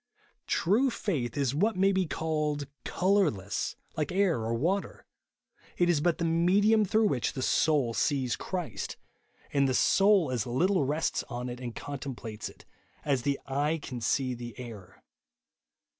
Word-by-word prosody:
True 225 +10 +2
faith 145 - -2
is 135 -2 +1
what 210 +10 +1
may 195 +2 +3
be 190 -2 +1
called 150 -2 -1 0.2
colourless, 175 - 0 0.2
like 150 0 -1
air 185 -7 +2
or 115 +1 -1
water; 180 +11 -1 0.7
it 175 0 +3
is 150 -4 +1
but 170 0 +2
the 170 - -1
medium 195 +7 +4
through 220 +3 +2
which 135 - 0
the 130 - -3
soul 145 -7 +2
sees 130 -1 +1
Christ, 180 -4 -4 0.6
and 140 -1 +3
the 130 - +1
soul 195 -4 +4
as 120 -3 -1
little 170 +7 +2
rests 150 +4 0
on 125 +1 -4
it 120 0 -6
and 120 -3 -6
contemplates 125 -6 -6
it, - - -17 0.4
as 140 -4 +1
the 140 +2 0
eye 145 +4 0
can 125 -4 -7
see 130 +3 +1
the 120 -2 -8
air. 105 -7 -10
145 Hz, 155 wpm, -29 LUFS, 125-185 Hz, 0.7 s, medium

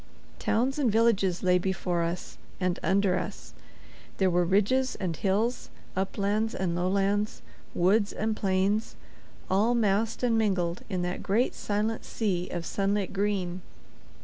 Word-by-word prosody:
Towns 260 +6 +1
and 255 -6 +3
villages 200 -5 +2
lay 180 0 +4
before 180 -2 -1
us 170 +1 -4 0.2
and 180 -2 0
under 190 -1 +2
us; - - -7 0.6
there 190 -2 +3
were 175 0 +3
ridges 210 +9 +2
and 180 -4 -3
hills, 210 +8 0 0.3
uplands 200 +3 0
and 175 -2 -1
lowlands, 200 +3 0 0.3
woods 200 +4 +3
and 220 0 -1
plains, 195 +2 0 0.5
all 215 +6 +2
massed 220 +1 +1
and 230 -2 +3
mingled 185 -5 0
in 185 -3 -1
that 180 +1 -3
great 225 +6 +1
silent 215 +2 -2
sea 185 -5 -2
of 170 -1 -4
sunlit 200 0 -1
green. 190 -3 -1
195 Hz, 135 wpm, -28 LUFS, 185-215 Hz, 0.6 s, lay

